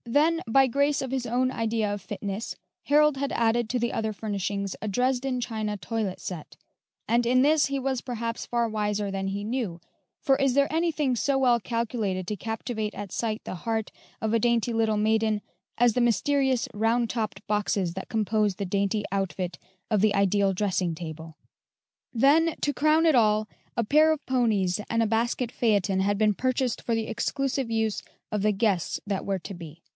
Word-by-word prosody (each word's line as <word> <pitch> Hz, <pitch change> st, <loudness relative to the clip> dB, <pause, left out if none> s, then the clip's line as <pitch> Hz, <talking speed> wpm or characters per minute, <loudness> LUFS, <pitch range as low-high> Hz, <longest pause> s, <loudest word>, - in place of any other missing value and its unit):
Then, 305 Hz, +7 st, +2 dB
by 270 Hz, +4 st, +5 dB
grace 280 Hz, +3 st, +1 dB
of 260 Hz, -, -5 dB
his 260 Hz, -2 st, -2 dB
own 255 Hz, +2 st, +1 dB
idea 225 Hz, -3 st, -1 dB
of 205 Hz, -, -5 dB
fitness, 200 Hz, +2 st, -5 dB, 0.3 s
Harold 300 Hz, -1 st, +4 dB
had 280 Hz, 0 st, -2 dB
added 230 Hz, 0 st, +1 dB
to 250 Hz, -, 0 dB
the 235 Hz, 0 st, -1 dB
other 220 Hz, -1 st, -1 dB
furnishings 200 Hz, -1 st, -3 dB
a 215 Hz, -, -3 dB
Dresden 255 Hz, +4 st, 0 dB
china 220 Hz, -3 st, -3 dB
toilet 200 Hz, +1 st, -3 dB
set, 170 Hz, -5 st, -7 dB, 0.5 s
and 235 Hz, +1 st, +3 dB
in 255 Hz, +2 st, +4 dB
this 300 Hz, +1 st, +4 dB
he 275 Hz, 0 st, -2 dB
was 265 Hz, -2 st, -1 dB
perhaps 235 Hz, -2 st, -4 dB
far 235 Hz, -1 st, +1 dB
wiser 210 Hz, -2 st, -1 dB
than 195 Hz, 0 st, -2 dB
he 200 Hz, +1 st, -3 dB
knew, 215 Hz, -6 st, -3 dB, 0.4 s
for 270 Hz, -, +3 dB
is 270 Hz, -2 st, +2 dB
there 280 Hz, 0 st, +3 dB
anything 315 Hz, -5 st, +1 dB
so 275 Hz, +3 st, +1 dB
well 245 Hz, -3 st, +4 dB
calculated 220 Hz, -5 st, -2 dB
to 210 Hz, -, -2 dB
captivate 220 Hz, 0 st, -4 dB
at 205 Hz, -2 st, -6 dB
sight 220 Hz, -2 st, -2 dB
the -, -, -5 dB
heart 225 Hz, 0 st, -2 dB, 0.3 s
of 220 Hz, 0 st, -1 dB
a 230 Hz, -, +4 dB
dainty 235 Hz, 0 st, +1 dB
little 220 Hz, -1 st, +1 dB
maiden 220 Hz, 0 st, +2 dB, 0.4 s
as 240 Hz, -1 st, +4 dB
the 250 Hz, -, +1 dB
mysterious 260 Hz, +3 st, +2 dB
round 230 Hz, +3 st, +1 dB
topped 215 Hz, -3 st, -3 dB
boxes 205 Hz, -4 st, 0 dB
that 190 Hz, +1 st, -7 dB
compose 215 Hz, -2 st, +1 dB
the 200 Hz, -, -3 dB
dainty 200 Hz, +2 st, 0 dB
outfit 185 Hz, -2 st, -2 dB, 0.3 s
of 210 Hz, -3 st, +3 dB
the 210 Hz, -1 st, +3 dB
ideal 200 Hz, 0 st, +3 dB
dressing 185 Hz, -3 st, 0 dB
table? 160 Hz, -1 st, -8 dB, 0.7 s
Then, 300 Hz, +7 st, +4 dB
to 290 Hz, -, +1 dB
crown 310 Hz, +4 st, +3 dB
it 315 Hz, -3 st, +5 dB
all, 215 Hz, -2 st, +3 dB, 0.3 s
a 235 Hz, -, +2 dB
pair 305 Hz, +7 st, +5 dB
of 310 Hz, -2 st, -2 dB
ponies 215 Hz, -7 st, +1 dB
and 230 Hz, 0 st, +1 dB
a -, -, +1 dB
basket 235 Hz, +2 st, 0 dB
phaeton 205 Hz, -5 st, +1 dB
had 200 Hz, +1 st, +1 dB
been 215 Hz, 0 st, +3 dB
purchased 255 Hz, +2 st, -1 dB
for 230 Hz, -, -1 dB
the 225 Hz, -1 st, -2 dB
exclusive 270 Hz, +2 st, -1 dB
use 220 Hz, -2 st, 0 dB, 0.3 s
of 210 Hz, -2 st, -1 dB
the 215 Hz, +1 st, +3 dB
guests 195 Hz, -4 st, 0 dB
that 200 Hz, -2 st, -2 dB
were 195 Hz, -1 st, -1 dB
to 195 Hz, -, -8 dB
be. 170 Hz, -2 st, -10 dB
225 Hz, 185 wpm, -26 LUFS, 205-250 Hz, 0.7 s, by